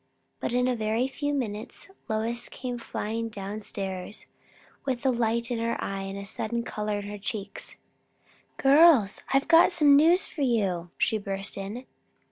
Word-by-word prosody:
But - - -2
in 250 +1 +2
a 255 - +1
very 220 +3 0
few 290 +2 -3
minutes 225 -5 -4 0.2
Lois 225 +2 -1
came 250 -1 -5
flying 230 0 -3
down 205 0 -6
stairs, 195 -1 -5 0.6
with 260 -2 -2
light 235 -1 +1
in 235 - -1
her 230 0 -1
eyes 195 0 -3
and 195 - -6
a 200 - -6
sudden 235 +3 -3
colour 210 -2 -3
in 205 - -8
her 205 0 -6
cheeks. 200 0 -5 0.8
"Girls, 275 - +5
I've 270 0 +2
got 335 +2 +7
some 295 -5 +6
news 335 +6 +5
for 305 - -7
you!" 195 -9 +1
she 220 - +1
burst 195 0 -3
in. 205 +6 -6
225 Hz, 160 wpm, -27 LUFS, 205-255 Hz, 0.8 s, got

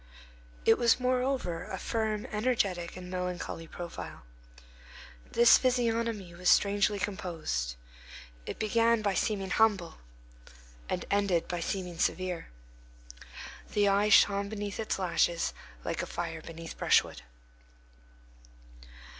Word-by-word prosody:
It - - +5
was, 235 0 +4
moreover, 250 -8 0
a 190 - -5
firm, 220 -1 -2
energetic, 205 -7 0
and 180 0 -8
melancholy 180 -2 -4
profile. 175 0 -8 1.1
This 235 0 +7
physiognomy 230 -6 0
was 180 +1 0
strangely 205 +1 +3
composed; 165 - -3 0.7
it - - -5
began 230 +1 +2
by 200 -2 +1
seeming 195 -1 -1
humble, 200 -6 +2 0.9
and - - -2
ended 200 -4 +1
by 175 - -3
seeming 180 -1 -4
severe. 180 -1 -1 1.3
The 205 -1 +3
eye 200 +2 +3
shone 200 -1 +5
beneath 205 -1 -5
its 220 - -1
lashes 175 -2 +1 0.3
like - - -2
a - - -5
fire 165 -2 -4
beneath 165 0 -9
brushwood. - - +2
200 Hz, 110 wpm, -30 LUFS, 175-220 Hz, 1.3 s, This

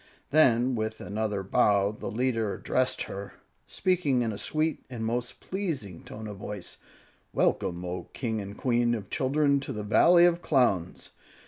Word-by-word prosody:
Then, 130 -4 +4
with 110 -1 -3
another 105 -1 -2
bow, 100 +1 +3
the 105 - -6
leader 115 -3 0
addressed 130 0 0
her, 100 0 -7 0.3
speaking 155 -9 +1
in 115 - -1
a - - -6
sweet 155 0 -1
and 115 -3 -4
most 120 +1 -3
pleasing 150 - -4
tone 110 +1 -9
of 105 -2 -7
voice, 100 -2 -7 0.6
"Welcome, 90 +1 0
O 90 +1 -4
King 110 -4 -3
and 100 +1 -8
Queen 120 -1 +2
of 100 -4 -7
Children, 140 +1 +2
to 135 - -6
the 105 - -4
Valley 170 +11 +6
of 175 0 +2
Clowns! 120 - +1
115 Hz, 155 wpm, -28 LUFS, 105-135 Hz, 0.6 s, Valley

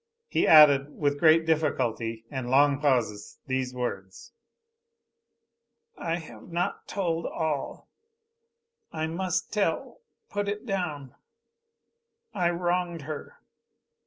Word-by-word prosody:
He - - +1
added, 150 -2 +7
with 145 -1 0
great 160 0 +5
difficulty 120 -8 -1
and 130 -3 -4
long 140 +1 +4
pauses 120 -8 0
these 130 -1 -2
words. 95 -7 -5 1.6
"I 165 - -2
have 155 -7 -10
not 175 +1 -2
told 170 -4 -2
all. 155 -4 -3 1.0
I 160 0 -2
must 175 +2 -2
tell 205 - -1 0.3
put 205 0 -3
it 205 +3 -3
down 155 - -3 1.2
I 175 -3 +1
wronged 175 -1 -1
her. 155 +1 -8
155 Hz, 100 wpm, -27 LUFS, 130-175 Hz, 1.6 s, added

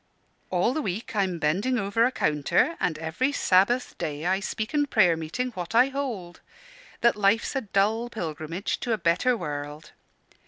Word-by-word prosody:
All 185 +7 +1
the 310 - -1
week 210 0 -4
I'm 190 -4 0
bending 185 +12 0
over 200 +2 +1
a 255 - +1
counter, 150 - +1
and 160 -3 0
every 160 - -1
Sabbath 240 0 +2
day 150 +1 -4
I 190 +2 +2
speak 215 +5 -4
in 290 -1 +2
prayer 185 -10 +4
meeting 165 +11 -3
what 185 +1 -6
I 250 +3 +6
hold, 240 -11 -5 0.6
that 235 - +4
life's 210 +5 +1
a 270 - +1
dull 215 +2 0
pilgrimage 165 -2 -4
to 235 - -1
a - - +1
better 185 +8 +2
world. 145 -2 -6
200 Hz, 165 wpm, -26 LUFS, 170-240 Hz, 0.6 s, I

